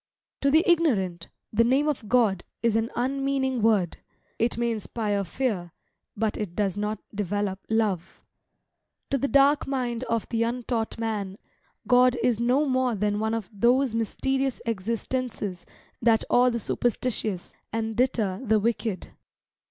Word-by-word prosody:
To 280 Hz, -, +3 dB
the 315 Hz, +4 st, +5 dB
ignorant, 210 Hz, -, +1 dB, 0.2 s
the 230 Hz, +2 st, +4 dB
name 265 Hz, +5 st, +2 dB
of 250 Hz, -8 st, -2 dB
God 220 Hz, -7 st, +3 dB, 0.2 s
is 230 Hz, -2 st, +2 dB
an 225 Hz, +1 st, +1 dB
unmeaning 265 Hz, 0 st, 0 dB
word; 210 Hz, -6 st, +2 dB, 0.4 s
it 230 Hz, +1 st, +1 dB
may 235 Hz, 0 st, +1 dB
inspire 210 Hz, -2 st, -2 dB
fear, 190 Hz, -5 st, -2 dB, 0.4 s
but 220 Hz, 0 st, 0 dB
it 195 Hz, -5 st, -4 dB
does 200 Hz, -3 st, 0 dB
not 210 Hz, +1 st, -2 dB, 0.2 s
develope 205 Hz, -1 st, -2 dB
love. 205 Hz, -6 st, 0 dB, 0.9 s
To 275 Hz, -, +2 dB
the 280 Hz, -, 0 dB
dark 280 Hz, +1 st, +4 dB
mind 250 Hz, -3 st, -2 dB
of 230 Hz, -2 st, -1 dB
the 230 Hz, -1 st, -1 dB
untaught 235 Hz, -1 st, -1 dB
man, 210 Hz, -4 st, -3 dB, 0.5 s
God 250 Hz, 0 st, +5 dB
is 235 Hz, -3 st, +2 dB
no 250 Hz, +5 st, +2 dB
more 255 Hz, -3 st, +1 dB
than 205 Hz, 0 st, 0 dB
one 220 Hz, +1 st, 0 dB
of 220 Hz, -4 st, -4 dB
those 245 Hz, +4 st, +3 dB
mysterious 265 Hz, +4 st, -1 dB
existences 225 Hz, -3 st, -3 dB, 0.3 s
that 230 Hz, -2 st, +4 dB
awe 250 Hz, +1 st, +5 dB
the 235 Hz, -, -1 dB
superstitious, 225 Hz, -4 st, -2 dB, 0.2 s
and 225 Hz, 0 st, -2 dB
deter 235 Hz, -4 st, 0 dB
the 220 Hz, -3 st, +3 dB
wicked. 220 Hz, -2 st, -2 dB
230 Hz, 145 wpm, -26 LUFS, 210-255 Hz, 0.9 s, the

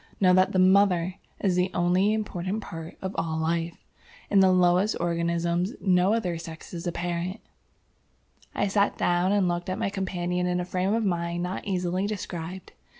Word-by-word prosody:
Know 185 Hz, -2 st, +5 dB
that 185 Hz, +1 st, +4 dB
the -, -, 0 dB
MOTHER 185 Hz, -1 st, +4 dB, 0.3 s
is 190 Hz, -3 st, +2 dB
the 180 Hz, +1 st, +2 dB
only 180 Hz, +4 st, +3 dB
important 210 Hz, -1 st, -2 dB
part 165 Hz, 0 st, -8 dB
of 190 Hz, +1 st, -3 dB
all 160 Hz, -1 st, -2 dB
life. 165 Hz, +1 st, -1 dB, 0.5 s
In 200 Hz, -, +5 dB
the 190 Hz, -1 st, +6 dB
lowest 180 Hz, +3 st, +3 dB
organisms 170 Hz, +3 st, 0 dB
no 185 Hz, +2 st, +3 dB
other 180 Hz, -7 st, -2 dB
sex 165 Hz, +1 st, -10 dB
is 170 Hz, +1 st, -5 dB
apparent." 175 Hz, +3 st, -3 dB, 1.2 s
I -, -, +1 dB
sat 200 Hz, +1 st, +1 dB
down 175 Hz, +2 st, +2 dB
and 200 Hz, -2 st, +2 dB
looked 175 Hz, +1 st, -2 dB
at 185 Hz, -, -2 dB
my 195 Hz, -, -1 dB
companion 180 Hz, -2 st, -2 dB
in 180 Hz, 0 st, 0 dB
a 180 Hz, -, -2 dB
frame 185 Hz, +3 st, 0 dB
of 225 Hz, -1 st, 0 dB
mind 170 Hz, -1 st, -1 dB
not 180 Hz, +1 st, -4 dB
easily 185 Hz, 0 st, -1 dB
described. 185 Hz, -3 st, -6 dB
180 Hz, 170 wpm, -26 LUFS, 175-190 Hz, 1.2 s, the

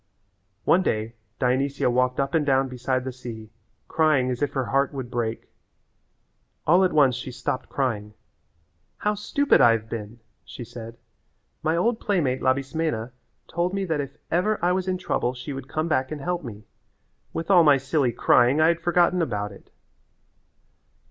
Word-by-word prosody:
One 185 Hz, -, +4 dB
day 110 Hz, -9 st, -1 dB, 0.2 s
Dionysia 135 Hz, +2 st, +1 dB
walked 125 Hz, +1 st, +1 dB
up 140 Hz, 0 st, -1 dB
and 160 Hz, -, +3 dB
down 135 Hz, -1 st, +2 dB
beside 130 Hz, 0 st, -2 dB
the 130 Hz, -, -4 dB
sea, 115 Hz, -4 st, -9 dB, 0.4 s
crying 150 Hz, -5 st, +2 dB
as 125 Hz, -, -4 dB
if 145 Hz, -1 st, 0 dB
her 135 Hz, -2 st, -1 dB
heart 140 Hz, +2 st, 0 dB
would 130 Hz, -3 st, -5 dB
break. 115 Hz, -2 st, -3 dB, 1.2 s
All 180 Hz, +4 st, +5 dB
at 185 Hz, -, +2 dB
once 140 Hz, -4 st, +4 dB
she 125 Hz, 0 st, -6 dB
stopped 130 Hz, +1 st, -4 dB
crying. 105 Hz, -6 st, -2 dB, 0.8 s
"How 210 Hz, -, 0 dB
stupid 275 Hz, +7 st, +2 dB
I 115 Hz, -, +7 dB
have 110 Hz, -1 st, -4 dB
been," 115 Hz, 0 st, -6 dB, 0.2 s
she 125 Hz, -, -9 dB
said. 115 Hz, 0 st, -10 dB, 0.6 s
"My 160 Hz, +2 st, +1 dB
old 225 Hz, +5 st, +1 dB
playmate 155 Hz, -11 st, 0 dB
Labismena 130 Hz, -2 st, -1 dB, 0.4 s
told 175 Hz, +3 st, -1 dB
me 195 Hz, -1 st, -1 dB
that 160 Hz, -4 st, -1 dB
if 140 Hz, 0 st, -8 dB
ever 195 Hz, +5 st, +2 dB
I 180 Hz, -, +3 dB
was 185 Hz, 0 st, -1 dB
in 185 Hz, 0 st, 0 dB
trouble 125 Hz, -8 st, -1 dB
she 125 Hz, +3 st, -6 dB
would 135 Hz, -1 st, -7 dB
come 155 Hz, +1 st, -1 dB
back 130 Hz, -4 st, 0 dB
and 155 Hz, -, -4 dB
help 175 Hz, +3 st, -2 dB
me. 110 Hz, -4 st, -9 dB, 0.7 s
With 165 Hz, +4 st, -3 dB
all 175 Hz, -3 st, +7 dB
my 145 Hz, -3 st, +6 dB
silly 135 Hz, -1 st, 0 dB
crying 125 Hz, +3 st, +3 dB
I 160 Hz, +1 st, +5 dB
had 170 Hz, 0 st, 0 dB
forgotten 175 Hz, +1 st, +2 dB
about 105 Hz, -9 st, -2 dB
it." 100 Hz, -, -15 dB
135 Hz, 170 wpm, -24 LUFS, 125-165 Hz, 1.2 s, I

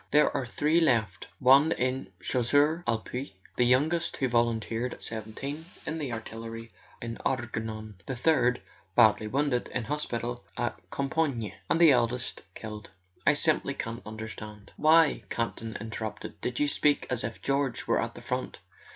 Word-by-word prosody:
"There 150 Hz, +1 st, +4 dB
are 130 Hz, -, -1 dB
three 150 Hz, +7 st, +2 dB
left: 110 Hz, -, +1 dB
one 140 Hz, +4 st, +6 dB
in 130 Hz, -1 st, -1 dB
the 90 Hz, -, -23 dB
Chasseurs 145 Hz, +7 st, +3 dB
ct 115 Hz, -2 st, 0 dB
Pied; 125 Hz, -3 st, -4 dB, 0.2 s
the 125 Hz, -, +3 dB
youngest, 155 Hz, +7 st, +2 dB
who 130 Hz, -, +1 dB
volunteered 120 Hz, 0 st, 0 dB
at -, -, -14 dB
seventeen, 115 Hz, +8 st, -5 dB, 0.2 s
in 160 Hz, +1 st, -3 dB
the 140 Hz, -5 st, -3 dB
artillery 115 Hz, 0 st, -6 dB, 0.3 s
in 115 Hz, 0 st, -4 dB
the -, -, -11 dB
Argonne; 110 Hz, -5 st, -3 dB
the 130 Hz, -, -2 dB
third, 125 Hz, -2 st, +2 dB, 0.3 s
badly 110 Hz, -2 st, +5 dB
wounded, 135 Hz, +1 st, 0 dB
in 125 Hz, -, -1 dB
hospital 120 Hz, -3 st, -3 dB
at 120 Hz, -2 st, -2 dB
Compiegne. 135 Hz, -, -1 dB, 0.2 s
And 165 Hz, -, +3 dB
the 165 Hz, -3 st, +8 dB
eldest 120 Hz, -1 st, +1 dB
killed. 105 Hz, -2 st, -7 dB, 0.4 s
I -, -, +7 dB
simply -, -, +1 dB
can't 115 Hz, +1 st, -4 dB
understand.. 110 Hz, -1 st, -8 dB
." -, -, -32 dB
"Why," 155 Hz, -4 st, +5 dB
Campton 115 Hz, -1 st, -3 dB
interrupted, 110 Hz, 0 st, -6 dB
"did 125 Hz, -, -2 dB
you 145 Hz, -, +3 dB
speak 145 Hz, 0 st, +2 dB
as 125 Hz, -3 st, 0 dB
if 115 Hz, +1 st, -4 dB
George 135 Hz, -3 st, 0 dB
were -, -, +2 dB
at -, -, -4 dB
the -, -, -9 dB
front? -, -, -3 dB
120 Hz, 165 wpm, -29 LUFS, 115-140 Hz, 0.4 s, the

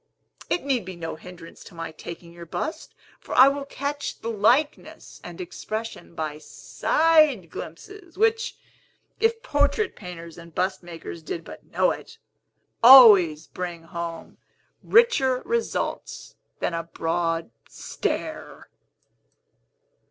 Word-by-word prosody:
It 355 Hz, -, 0 dB
need 270 Hz, -4 st, 0 dB
be 185 Hz, 0 st, -8 dB
no 165 Hz, -2 st, -5 dB
hindrance 175 Hz, +1 st, -12 dB
to -, -, -14 dB
my 165 Hz, -1 st, -6 dB
taking 170 Hz, +1 st, -10 dB
your 170 Hz, 0 st, -11 dB
bust; 315 Hz, -, -5 dB, 0.2 s
for -, -, -7 dB
I 260 Hz, +2 st, +8 dB
will 280 Hz, 0 st, -4 dB
catch 285 Hz, +1 st, -4 dB
the 230 Hz, -, -4 dB
likeness 240 Hz, +8 st, 0 dB
and -, -, -9 dB
expression 225 Hz, -, -6 dB
by 155 Hz, -1 st, -4 dB
side 310 Hz, -, +2 dB
glimpses, 355 Hz, -, -10 dB
which 450 Hz, +2 st, +1 dB, 0.6 s
(if 455 Hz, +1 st, +1 dB
portrait 290 Hz, +4 st, +1 dB
painters 170 Hz, -2 st, -10 dB
and 170 Hz, -1 st, -14 dB
bust 190 Hz, +1 st, -1 dB
makers 170 Hz, -1 st, -9 dB
did 165 Hz, +1 st, -5 dB
but -, -, -12 dB
know -, -, +1 dB
it) -, -, -8 dB, 0.6 s
always 210 Hz, -, +9 dB
bring 175 Hz, -2 st, -6 dB
home 165 Hz, 0 st, -7 dB, 0.4 s
richer 275 Hz, -, +3 dB
results 465 Hz, 0 st, -3 dB, 0.2 s
than -, -, -2 dB
a 165 Hz, -, -1 dB
broad 165 Hz, -2 st, -2 dB, 0.2 s
stare." -, -, -5 dB
190 Hz, 120 wpm, -24 LUFS, -, 0.6 s, always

